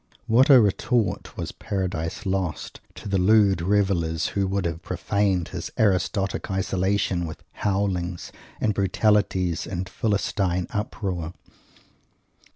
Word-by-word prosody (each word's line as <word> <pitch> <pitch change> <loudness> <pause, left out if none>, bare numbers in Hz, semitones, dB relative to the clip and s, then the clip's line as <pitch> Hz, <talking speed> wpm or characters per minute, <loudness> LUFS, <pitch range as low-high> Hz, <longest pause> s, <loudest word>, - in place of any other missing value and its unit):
What 125 +6 +4
a 135 -3 +9
retort 110 0 0
was - - -4
"Paradise 95 -2 -3
Lost" 95 -4 -3
to - - -9
the 95 -1 +1
lewd 100 -2 +4
revellers 90 -4 +1
who 100 -1 0
would 95 -1 -1
have 85 0 -3
profaned 95 0 0
his - - -5
aristocratic 100 0 +1
isolation 95 -1 0
with 80 - -9
howlings 95 -3 -2 0.3
and 110 - +1
brutalities 95 -3 +1
and 90 0 -4
philistine 95 -3 0
uproar! 95 -6 -3
95 Hz, 115 wpm, -24 LUFS, 90-100 Hz, 0.3 s, a